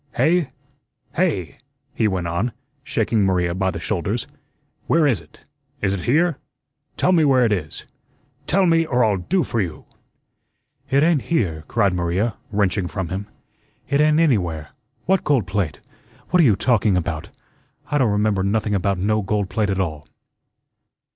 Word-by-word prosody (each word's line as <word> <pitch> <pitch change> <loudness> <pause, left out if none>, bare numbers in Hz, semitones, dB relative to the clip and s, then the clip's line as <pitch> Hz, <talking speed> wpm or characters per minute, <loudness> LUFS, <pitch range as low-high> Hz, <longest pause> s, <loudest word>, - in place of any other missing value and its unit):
"Hey? 165 -2 +2 0.6
hey?" 90 -3 -1 0.4
he 110 - +1
went 95 -4 -1
on, 85 +8 -1 0.3
shaking 115 -6 0
Maria 90 -3 +1
by 95 +1 0
the 95 - -4
shoulders. - - -2 0.6
"Where 165 -1 +3
is 120 - +2
it? 80 - -21 0.3
Is 95 -3 0
it 95 -3 -4
here? 165 +3 +2 0.6
Tell - - +3
me 170 -3 +4
where 130 -4 +4
it 110 - +1
is. 80 -8 -3 0.6
Tell 195 +2 +3
me, 165 -1 +4
or 125 -6 +1
I'll 105 -3 +1
do 175 - 0
for 115 - -1
you!" 80 -6 -5 1.0
"It 140 +2 +3
ain't 160 -4 +3
here," 85 - 0
cried 100 -5 +1
Maria, 90 +6 -1 0.2
wrenching 100 -2 +1
from 95 -2 -4
him. 95 +2 -4 0.6
"It 140 +1 +3
ain't 155 +1 +4
anywhere. 90 - +1 0.4
What 190 0 +2
gold 135 -9 +2
plate? 95 -5 -2 0.5
What 180 - +5
are - - +5
you 110 -6 +5
talking 105 -3 +2
about? 80 -3 -3 0.6
I 145 - +2
don't 125 -5 +3
remember 105 -1 +1
nothing 105 +2 0
about 100 0 0
no 105 +4 +1
gold 100 -1 -2
plate 105 -2 0
at 95 -1 -1
all." 80 -5 -3
105 Hz, 160 wpm, -21 LUFS, 95-135 Hz, 1.0 s, What